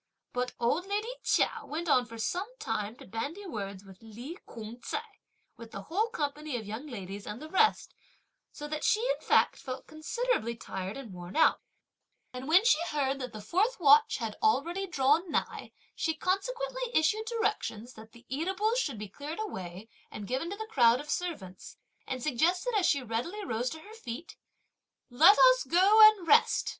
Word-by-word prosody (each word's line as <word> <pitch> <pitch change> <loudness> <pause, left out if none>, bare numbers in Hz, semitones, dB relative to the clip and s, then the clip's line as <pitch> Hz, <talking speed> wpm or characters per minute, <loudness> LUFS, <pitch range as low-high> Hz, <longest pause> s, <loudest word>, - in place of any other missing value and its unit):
But 250 0 -2
old 295 +10 0
lady 415 +3 -2
Chia - - +1
went 330 +3 -5
on 250 -5 +3
for 230 0 -10
some 355 - -2
time 220 - -3
to - - -14
bandy 285 - -5
words 200 - -6
with 190 -1 -15
Li 235 +8 -9
Kung 225 +1 -9
ts'ai, - - -6 0.4
with 230 -1 -10
the 195 -2 -8
whole 405 - -1
company 300 - -3
of 220 - -7
young 220 +8 -6
ladies 200 -5 -7
and 210 +2 -6
the 310 - -8
rest, 435 +3 +2 0.6
so 295 - -7
that 305 0 -4
she, 425 - +3
in - - -1
fact, - - +4
felt 260 -1 -7
considerably 310 - -2
tired 190 -2 -6
and 240 -8 -9
worn 175 +1 -9
out; 320 - +4 0.7
and 255 +1 -7
when 360 +7 +5
she 470 -10 +5
heard 275 -2 -1
that 255 -2 -5
the 215 -1 -9
fourth 390 - +1
watch 290 -2 +6
had 225 -3 -4
already 390 -2 +1
drawn 305 +2 +2
nigh, 300 - -3 0.2
she 320 -1 -1
consequently - - -2
issued 370 +8 +2
directions 415 - -2
that 220 0 -13
the 235 +1 -18
eatables 385 - 0
should 285 - -2
be 210 0 -6
cleared 290 - -7
away 190 - -6 0.2
and 210 - -7
given 265 - -2
to 400 - -4
the 440 - -5
crowd 245 - +4
of 295 +1 -6
servants, 210 - -5 0.3
and 255 -2 -4
suggested, 345 - +1
as 390 -4 +3
she 280 -3 +2
readily 250 - -4
rose 240 -3 -1
to 315 - -8
her 420 +6 -13
feet, 320 - -8 0.8
"Let 325 +11 +7
us - - +6
go 390 +5 +5
and 395 -6 -6
rest! 300 - +4
295 Hz, 180 wpm, -30 LUFS, 230-385 Hz, 0.8 s, Let